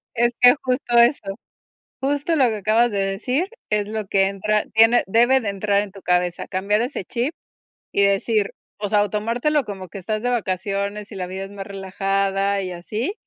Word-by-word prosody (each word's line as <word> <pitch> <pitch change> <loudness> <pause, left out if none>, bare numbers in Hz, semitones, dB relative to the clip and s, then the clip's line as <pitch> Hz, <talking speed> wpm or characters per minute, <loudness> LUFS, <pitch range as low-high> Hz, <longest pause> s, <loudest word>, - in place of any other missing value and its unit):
Es 240 +1 +2
que 245 0 +8
justo 250 -2 0
eso. 235 -5 +3 0.7
Justo 290 +4 0
lo 265 -5 +4
que 220 - -2
acabas 220 +4 +2
de 200 - -1
decir 235 - -1 0.2
es 210 -1 0
lo 215 -1 -4
que 195 0 +3
entra 210 +2 0
tiene 225 +2 +5
debe 240 +6 +4
de 215 - -2
entrar 200 0 +1
en 205 - -6
tu 195 0 -13
cabeza, 180 -1 0
cambiar 200 +3 0
ese 240 -6 -3
chip 250 - -2 0.6
y 200 - +3
decir 200 +1 +1 0.3
o 205 - -3
sea, 205 0 +3
o 205 - -3
tomártelo 240 +8 0
como 195 -4 -8
que 195 - -8
estás 215 +4 -3
de 245 - +1
vacaciones 200 -1 -2
y 205 - -8
la 185 -1 -4
vida 190 +1 -5
es 195 - -12
más 195 -1 -7
relajada 195 0 -1
y 185 - -4
así, 210 - -4
205 Hz, 195 wpm, -22 LUFS, 195-235 Hz, 0.7 s, que